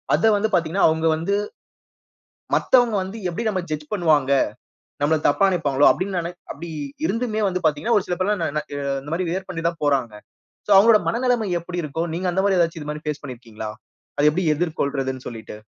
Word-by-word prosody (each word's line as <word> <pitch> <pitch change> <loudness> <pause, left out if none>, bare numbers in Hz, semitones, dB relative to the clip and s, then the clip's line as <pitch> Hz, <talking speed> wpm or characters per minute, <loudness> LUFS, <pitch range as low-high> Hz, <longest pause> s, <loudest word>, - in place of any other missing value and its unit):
அத 225 0 +3
வந்து 215 +2 +1
பார்த்தீங்கன்னா, 170 +4 +2
அவங்க 160 +1 -1
வந்து 170 +6 -1 1.2
மத்தவங்க 245 -3 +3
வந்து 190 +4 -6
எப்டி 200 +7 -4
நம்ம 190 -3 0
ஜட்ஜ் 150 -1 -5
பண்ணுவாங்க? 155 -8 +2 0.7
நம்மள 155 +2 +3
தப்பா 170 +7 +3
நெனைப்பாங்களோ 145 -6 +3
அப்டின்னு, 185 -2 -2
நெ 175 - -5 0.2
அப்டி 165 +3 -8 0.4
இருந்துமே 220 0 -1
வந்து 185 -1 -2
பார்த்தீங்கன்னா, 155 +10 +2
ஒரு - - -8
சில 180 - -1
பேர் 185 - 0
எல்லாம், 170 -8 -1
நா- 150 - +1 0.4
இந்த 145 - -10
மாரி 180 +2 -1
வியர் 190 +2 -3
பண்ணி 165 -3 -4
தான் 170 -2 -11
போறாங்க. 135 -6 +1 0.5
சோ - - -1
அவங்களோட 215 +2 +7
மனநெலைம 240 -2 +1
எப்டி 175 +1 -5
இருக்கும்? 160 +3 -3
நீங்க 180 +3 -2
அந்த 190 - +1
மாரி 195 -2 +3
ஏதாச்சு. 165 -1 +1
இது 150 - -8
மாரி 150 0 -7
பேஸ் 150 -1 -3
பண்ணியிருக்கீங்களா. 115 -4 -7 0.5
அத 145 - +1
எப்டி 180 +4 -1
எதிர்கொள்றதுன்னு 140 -5 -2
சொல்லிட்டு? 110 -3 -8
170 Hz, 185 wpm, -22 LUFS, 145-195 Hz, 1.2 s, அவங்களோட